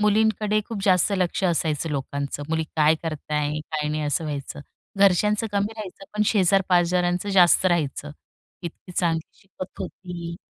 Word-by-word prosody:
मुलींकडे 215 0 +2
खूप 215 -4 -5
जास्त 185 +1 +3
लक्ष 185 +1 0
असायचं 165 -3 0
लोकांचं. 140 0 -3
मुली 160 0 0
काय 155 0 +5
करत 155 -3 -5
आहे 150 0 0
काय 150 0 -3
नाही 155 0 -2
असं 150 +2 -1
व्हायचं. 145 -2 -5 0.4
घरच्यांचं 205 +3 +3
कमी 205 +2 0
राहायचं 195 -2 -8
पण 210 - +3
शेजारपाजारांचं 180 -2 +2
जास्त 185 -1 +5
राहायचं. 150 -4 0 0.5
इतकी 175 +2 -8
चांगली 165 -2 0
शिकत 195 -2 -10
होती 175 -2 -6
175 Hz, 145 wpm, -24 LUFS, 155-195 Hz, 0.5 s, काय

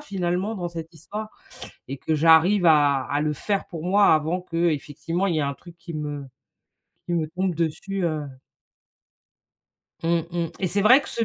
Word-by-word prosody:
finalement 190 -4 -2
dans 175 -2 -3
cette 165 -1 -8
histoire 210 +7 -7 0.6
et 135 - -4
que 160 - -2
j'arrive 165 +5 +5
à 145 -4 +4
à 145 +1 -1
le 150 0 0
faire 200 +7 -2
pour 165 -3 -7
moi 200 +1 +5
avant 160 +4 0
qu'effectivement, 165 0 -1
il 170 - 0
y - - 0
ait - - +1
un 140 -1 -1
truc 175 +5 -15
qui 170 - -9
me 145 -2 -4 0.8
qui 175 - -1
me 165 -2 0
tombe 180 +1 -2
dessus, 175 +4 -2
heu. 155 -3 -2 1.8
Mmh 165 - -1 0.2
mh 170 -1 -2
et 190 - +1
c'est 200 +3 +1
vrai 250 +7 +7
que - - -9
ce 230 - +1
170 Hz, 180 wpm, -24 LUFS, 155-185 Hz, 1.8 s, vrai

